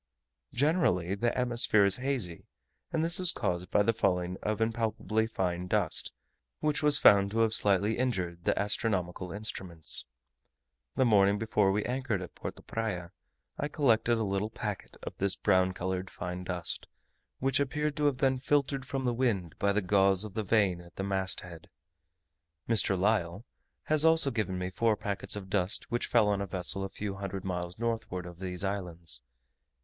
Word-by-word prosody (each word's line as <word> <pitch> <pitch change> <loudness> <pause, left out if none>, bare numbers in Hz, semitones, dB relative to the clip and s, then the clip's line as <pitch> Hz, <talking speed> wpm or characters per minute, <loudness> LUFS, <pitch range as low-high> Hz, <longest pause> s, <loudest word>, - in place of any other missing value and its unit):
Generally 120 - +2
the 115 +4 -1
atmosphere 120 -4 +4
is 100 - +3
hazy; 125 -10 -3 0.4
and 160 0 0
this 170 +3 +1
is 180 -2 +5
caused 90 0 -2
by 105 - +3
the 115 - +2
falling 90 -4 0
of 105 0 -2
impalpably 110 -1 0
fine 90 -4 -2
dust, 100 -4 0 0.5
which 150 -1 0
was 150 -1 +6
found 100 -5 +6
to 115 +3 0
have 110 -1 +2
slightly 105 +1 +2
injured 90 -9 -2
the - - +1
astronomical 95 -3 -1
instruments. 95 -9 0 0.9
The 130 - +3
morning 100 -3 +4
before 105 -2 +1
we 105 +2 -1
anchored 125 -7 -2
at 90 - -10
Porto - - -8
Praya, 95 -7 -4 0.5
I 145 - -1
collected 120 -6 +2
a 110 - 0
little 100 +1 -1
packet - - -6
of - - -6
this 100 0 +1
brown 95 0 +2
coloured 95 +1 -3
fine 90 0 -6
dust, 90 -2 -3 0.5
which 135 +1 +1
appeared 150 +2 -1
to 150 - +1
have 145 -3 +2
been 130 0 +1
filtered 140 -1 0
from 135 -2 -3
the 120 - +1
wind 105 - -1
by 100 - +2
the 105 0 0
gauze 95 0 +3
of 105 -3 -7
the 110 - -2
vane 100 -4 +1
at 85 0 -17
the 95 - -4
mast 95 -1 0
head. 85 -3 -12 1.0
Mr. 105 -4 +3
Lyell 100 0 0 0.4
has 155 -1 +4
also 160 -3 +4
given 105 -6 -2
me 90 0 -3
four 110 +2 +1
packets 100 0 -2
of 100 -2 -7
dust 95 +1 -1
which 120 - -1
fell 115 -3 +3
on 100 -1 +1
a 100 - -3
vessel 95 +1 -1
a 95 - -4
few 100 0 -5
hundred 95 -1 -5
miles 90 -1 -4
northward 110 -6 -3
of 85 -1 -10
these 90 -1 -3
islands. 85 -8 -2
100 Hz, 175 wpm, -30 LUFS, 90-115 Hz, 1.0 s, was